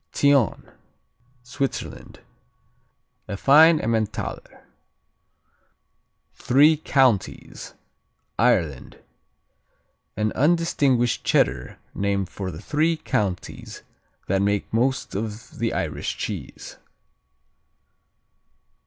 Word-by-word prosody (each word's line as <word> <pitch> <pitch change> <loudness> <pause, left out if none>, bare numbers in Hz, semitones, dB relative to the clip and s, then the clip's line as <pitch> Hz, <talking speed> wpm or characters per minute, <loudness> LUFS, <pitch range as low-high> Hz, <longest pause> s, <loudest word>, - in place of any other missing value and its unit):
Thion 140 -7 +1 0.7
Switzerland 135 +2 -5 1.1
A 100 - -5
fine 155 +7 +6
Emmentaler. 110 -3 -3 1.7
Three 145 +5 +4
Counties 130 -9 0 0.6
Ireland 75 -6 +1 1.2
An 110 0 0
undistinguished 140 -6 +1
Cheddar 60 0 0 0.2
named 100 -2 -1
for 95 0 -6
the 85 +3 -9
three 160 +5 +1
counties 100 - -4 0.4
that 95 +1 0
make 100 +1 -1
most 130 +4 0
of 105 +2 -6
the - - 0
Irish - - -3
cheese. - - -7
115 Hz, 75 wpm, -23 LUFS, 100-140 Hz, 1.7 s, fine